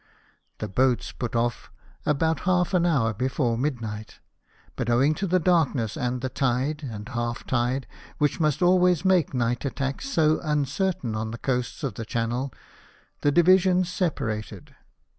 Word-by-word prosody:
The - - -4
boats 125 +4 +1
put 120 -1 -5
off 120 0 -1 0.4
about 160 +2 +1
half 180 +1 +2
an 175 -1 +3
hour 130 -9 +2
before 125 +1 0
midnight; 115 -5 -4 0.6
but 120 - -2
owing 130 +6 +4
to 195 +5 -3
the 185 +1 +3
darkness 150 - +1
and 125 0 -2
the 130 - -2
tide 135 +4 0
and 110 -7 -6
half 120 -1 -3
tide, 125 +2 0 0.3
which 150 +3 +1
must 155 +1 +1
always 180 -1 +4
make 180 -7 +3
night 120 0 0
attacks 140 - -3
so 155 - +2
un 150 -3 +1
certain 150 - -2
on 110 +1 -2
the 115 - -6
coasts 125 +4 -2
of 135 - -1
the 115 - -6
Channel, 120 +4 -2 0.7
the 145 - +3
divisions 180 +2 +4
separated. 110 - -3
135 Hz, 155 wpm, -25 LUFS, 120-165 Hz, 0.7 s, owing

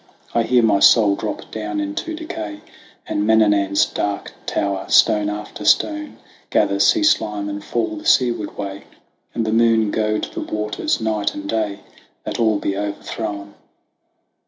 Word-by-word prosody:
"I 115 - +3
hear 120 +1 +3
my 105 -3 +3
soul 105 -1 +6
drop 105 +1 -5
down 105 -2 -4
into 100 - -3
decay, 110 - -6 0.4
And 105 - -1
Mananan's 105 -2 +3
dark 100 -1 -3
tower, 100 -1 -2
stone 105 -1 +4
by 105 0 -6
stone, 305 - +1 0.3
Gather - - +1
sea 325 -3 +4
slime 105 - +1
and 100 0 -5
fall 110 -1 -2
the - - -10
seaward 120 -5 +2
way, 100 -1 -6 0.5
And 115 - 0
the 110 - -1
moon 115 -2 +3
goad 110 -1 0
the - - -4
waters 105 0 -2
night 105 -2 -1
and 100 0 -6
day, 105 -2 -2 0.4
That - - -5
all 110 -2 +3
be 100 -1 -2
overthrown. 100 0 -5
105 Hz, 150 wpm, -20 LUFS, 100-110 Hz, 0.5 s, soul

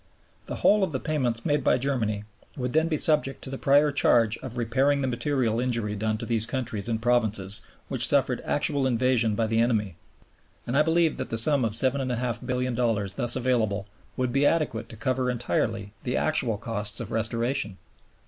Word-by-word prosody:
The - - -4
whole 210 0 +3
of 185 - -1
the 130 - -1
payments 125 -7 -1
made 145 0 +1
by - - +3
Germany 120 -6 -1 0.3
would 125 -2 -3
then 160 +1 +3
be 160 -2 0
subject 150 -3 +1
to 130 - -5
the 135 - -4
prior 145 +2 +4
charge 115 -5 +3
of 130 -2 -8
repairing 135 +5 +1
the - - 0
material 120 -2 0
injury 115 -4 -1
done 110 +1 -1
to 115 - -5
those 115 -1 0
countries 115 -4 -3
and 110 -1 -1
provinces 110 -5 +1 0.3
which - - 0
suffered - - +2
actual 140 -2 +1
invasion 120 -3 +2
by 115 - +1
the 110 +1 0
enemy; 105 -7 0 0.7
and 120 - -3
I 145 - +5
believe 160 0 +2
that - - -4
the 115 - -2
sum 140 +3 +4
of 110 -2 -1
$7,500,000,000 125 -3 -1
thus 120 -3 -1
available 115 -6 0 0.3
would 125 -2 -1
be 140 +1 +2
adequate 145 -7 0
to - - -10
cover 130 +2 -1
entirely 115 -4 -2
the 125 - -1
actual 140 -9 +1
costs 105 0 -2
of - - -5
restoration. 115 -1 -1
120 Hz, 180 wpm, -26 LUFS, 110-135 Hz, 0.7 s, I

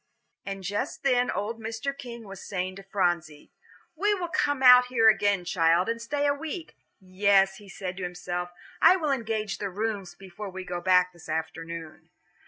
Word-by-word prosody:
And 195 -1 -5
just 205 - -3
then 250 -2 +2
old 225 +3 -3
Mr. 225 +5 -4
King 240 -4 -9
was 195 -1 -9
saying 185 -1 -3
to - - -8
Phronsie, 175 -6 -2 0.4
"We 410 +5 +2
will 355 -3 -4
come 290 -6 0
out 250 0 +9
here 235 -3 +3
again, 205 -4 +2
child, 170 0 +3
and 230 0 -2
stay 285 +5 -1
a 285 - +3
week. 320 +3 -6 0.2
Yes," 195 0 +2
he 205 -2 -14
said 185 -2 -6
to 190 - -5
himself, 180 0 -4 0.3
"I 370 - +8
will 310 -6 -1
engage 220 -5 -2
the 200 - -2
rooms 200 -2 -3
before 195 +2 -9
we 190 0 -7
go 175 -1 -4
back 180 0 +3
this 175 -2 -14
afternoon." 160 0 -5
200 Hz, 180 wpm, -27 LUFS, 180-245 Hz, 0.4 s, out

